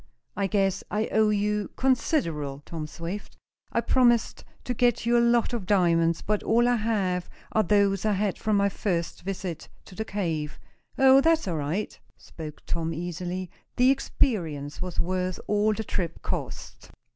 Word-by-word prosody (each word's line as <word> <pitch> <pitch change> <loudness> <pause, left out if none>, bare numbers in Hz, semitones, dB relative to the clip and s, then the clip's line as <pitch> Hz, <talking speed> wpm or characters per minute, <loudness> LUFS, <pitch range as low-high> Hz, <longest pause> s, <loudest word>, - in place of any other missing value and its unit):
"I 200 -1 0
guess 195 -1 +1
I 215 +1 0
owe 215 0 +4
you 210 0 0
considerable, 165 - 0
Tom 160 -2 -5
Swift. 170 +6 -7 0.3
I - - +1
promised 240 -3 +2 0.2
to 250 - -2
get 240 -1 +2
you 240 +1 +3
a 235 - +5
lot 235 0 +3
of 215 -6 -3
diamonds, 170 -4 +3
but 210 0 0
all 235 +2 +3
I 245 0 +3
have 195 -5 -1 0.2
are 220 - +3
those 200 -1 +2
I 215 -1 +2
had 200 -1 -1
from 215 -2 +1
my 200 0 +3
first 180 -4 -2
visit 185 -3 -5 0.2
to - - -13
the 220 - -3
cave." 165 -8 -3 0.4
"Oh, 265 0 +7
that's 325 -4 +2
all 170 -3 -1
right," 155 +8 -3 0.2
spoke 155 -2 -10
Tom, 165 -1 -2
easily. 175 +2 -4 0.2
"The 255 +1 +5
experience 165 - -1
was 180 -2 -4
worth 185 +1 -1
all 210 +1 +2
the 220 +1 -2
trip 175 -5 -3
cost." - - -5
195 Hz, 165 wpm, -26 LUFS, 170-220 Hz, 0.4 s, Oh